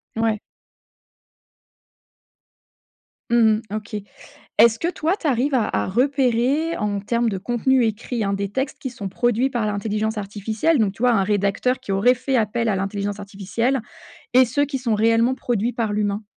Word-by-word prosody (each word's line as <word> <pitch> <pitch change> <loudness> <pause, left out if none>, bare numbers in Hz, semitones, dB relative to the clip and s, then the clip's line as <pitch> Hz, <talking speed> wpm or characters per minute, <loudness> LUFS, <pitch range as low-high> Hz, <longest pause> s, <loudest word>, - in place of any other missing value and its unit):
Ouais. 225 -1 0 2.9
Mmh 235 - +2 0.4
mh. - - -2
OK. 215 0 -6 0.6
Est-ce 230 +1 +6
que, 335 - -1
toi, 340 0 0
tu 320 - -2
arrives 270 +1 +1
à 230 -4 +2
à 105 0 -1
repérer 265 - +1
en 205 -2 -1
termes 235 +3 0
de 195 - -3
contenu 240 +5 +1
écrit, 225 +1 -2
hein, 200 0 0
des 200 0 -2
textes 265 +6 -3
qui 260 - -4
sont 205 -5 -6
produits 240 +5 +1
par 240 -5 -1
l'intelligence 215 +1 -2
artificielle 215 +9 0
donc 205 -3 +1
tu 225 - -7
vois, 250 - +5
un 210 -4 +3
rédacteur 205 +5 0
qui - - -6
aurait 200 +6 +4
fait 255 +1 -1
appel 230 +1 0
à 205 - +1
l'intelligence 200 +1 -3
artificielle 205 +6 -2 0.5
et 255 +1 +7
ceux 285 +5 +1
qui 280 -1 -3
sont 240 -4 0
réellement 230 +3 +3
produits 240 -2 -1
par 225 -3 -1
l'humain? 205 0 -1
225 Hz, 170 wpm, -22 LUFS, 205-250 Hz, 2.9 s, et